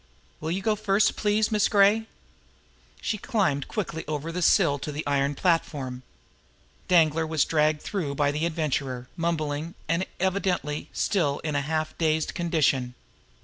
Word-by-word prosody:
Will 155 - -4
you 190 +3 -2
go 215 0 +2
first, 205 -1 +2
please, 210 +1 +1
Miss 210 -1 +3
Gray?" 205 +2 +4 0.9
She 215 - -2
climbed 190 - 0
quickly 170 -6 -3
over 155 +2 -3
the 180 +2 -3
sill 145 -4 +4
to 150 - -5
the 150 +2 -5
iron 140 0 +1
platform. 140 -7 0 0.9
Danglar 165 -2 +3
was 155 -2 +2
dragged 155 -1 +1
through 160 -9 -3
by 145 0 +2
the 155 +3 0
Adventurer, 140 -6 -2
mumbling, 165 -2 -2
and 170 +4 0
evidently 185 -6 -1
still 150 -9 0
in 155 -2 -2
a 145 - +2
half 155 +2 -2
dazed 160 -1 +1
condition. 145 -8 +1
160 Hz, 145 wpm, -26 LUFS, 145-185 Hz, 0.9 s, Gray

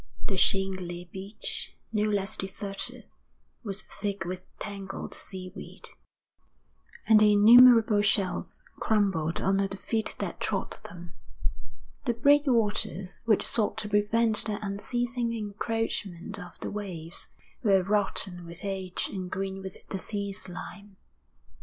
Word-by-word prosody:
The 195 - -1
shingly 185 -2 +1
beach, 195 +3 -5 0.2
no 215 0 +2
less 195 -2 +1
deserted, 195 +1 -5 0.6
was 205 -1 -2
thick 200 -2 -4
with 180 +1 -4 0.2
tangled 195 -1 -6
seaweed, 185 0 -7 1.2
and 220 -1 +8
the 210 0 +6
innumerable 225 0 +8
shells 200 -2 0 0.2
crumbled 190 -7 +1
under 195 +1 +2
the 195 0 -7
feet 220 +2 -2
that - - -4
trod - - -2
them. 175 0 -10 0.9
The 240 -3 +1
breakwaters, 230 - +2
which 220 -3 +3
sought 215 -2 0
to 210 -1 -3
prevent 215 +2 +2
the 210 -2 -1
unceasing 240 +4 -2
encroachment 210 -3 -3
of 180 -2 -10
the - - -3
waves, 180 -5 -3 0.3
were 195 -5 +4
rotten 195 -2 +2
with 170 +1 -9
age 190 -2 -2
and 185 -2 -4
green 195 +1 -3
with 190 -1 -9
the 195 - -3
sea 200 0 -3
slime. 195 +1 -6
200 Hz, 120 wpm, -28 LUFS, 190-215 Hz, 1.2 s, and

